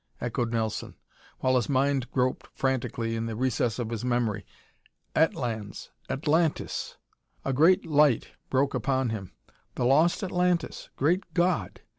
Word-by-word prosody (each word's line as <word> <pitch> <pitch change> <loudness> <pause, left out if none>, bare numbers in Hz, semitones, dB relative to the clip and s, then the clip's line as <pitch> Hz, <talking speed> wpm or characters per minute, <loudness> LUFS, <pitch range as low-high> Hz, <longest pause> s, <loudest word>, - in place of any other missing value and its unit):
echoed 120 0 -2
Nelson, 110 -2 -2 0.5
while 130 0 +3
his 120 - -1
mind 135 -1 +1
groped 130 -1 0
frantically 120 -3 -1
in 115 0 -2
the 115 - -4
recess 120 -1 0
of 120 -2 -3
his 115 0 -3
memory. 120 -5 0 0.7
"Atlans, 115 -9 -1 0.2
Atlantis!" 155 +2 0 0.5
A 135 - 0
great 175 +8 +5
light 150 -6 +3 0.2
broke 140 +1 +2
upon 130 -2 0
him. 100 -5 -5 0.4
"The 120 - 0
lost 155 - +4
Atlantis! 180 -2 0
Great 170 +8 +1
God!" 175 0 +1
130 Hz, 130 wpm, -27 LUFS, 115-150 Hz, 0.7 s, great